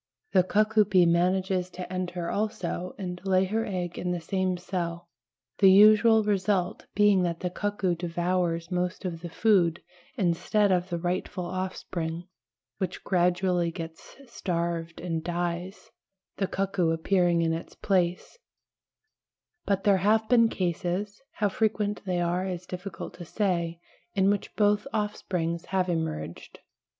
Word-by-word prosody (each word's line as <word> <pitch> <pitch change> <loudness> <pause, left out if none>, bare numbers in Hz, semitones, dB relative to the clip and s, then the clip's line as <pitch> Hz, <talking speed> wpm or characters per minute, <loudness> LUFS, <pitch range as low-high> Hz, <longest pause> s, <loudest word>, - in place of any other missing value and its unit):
The 190 - +5
cuckoo 215 +3 +3
bee 185 -3 +4
manages 180 +2 +1
to 180 0 -7
enter 180 -2 -3
also 200 -4 -3
and 180 -2 -5
lay 190 -1 +3
her 220 +4 -1
egg 180 -3 -3
in 180 - -2
the 175 -1 -1
same 185 +2 -1
cell, 175 -1 -4 0.5
the 195 - +7
usual 215 +3 +7
result 195 -2 0
being 205 -2 +5
that 170 -2 -1
the 180 - -2
cuckoo 200 -2 -1
devours 175 0 -1
most 180 +2 -2
of 165 -2 -4
the 175 - -6
food 175 -3 +2 0.3
instead 195 +3 +2
of 180 0 +1
the 170 - -2
rightful 180 +1 -2
offspring, 175 -2 -4 0.6
which 185 -2 -3
gradually 180 -1 +2
gets 165 -1 -9
starved 170 -7 -3
and 165 -2 -3
dies, 175 +2 -4 0.5
the 195 - 0
cuckoo 190 -3 0
appearing 170 +1 +2
in 165 0 +1
its 165 - -6
place; 180 - 0 1.3
but 195 -1 0
there 200 -2 +5
have 215 +4 +2
been 230 -1 +5
cases, 185 +3 -2
how 210 - +1
frequent 210 0 0
they 180 -1 0
are 175 +2 0
is 180 -1 -5
difficult 180 0 -7
to - - -6
say, 170 -3 -1 0.4
in 195 0 +4
which 205 - -3
both 205 +3 +2
offsprings 180 -5 -2
have 185 -1 0
emerged. 160 - -4
180 Hz, 140 wpm, -27 LUFS, 170-200 Hz, 1.3 s, the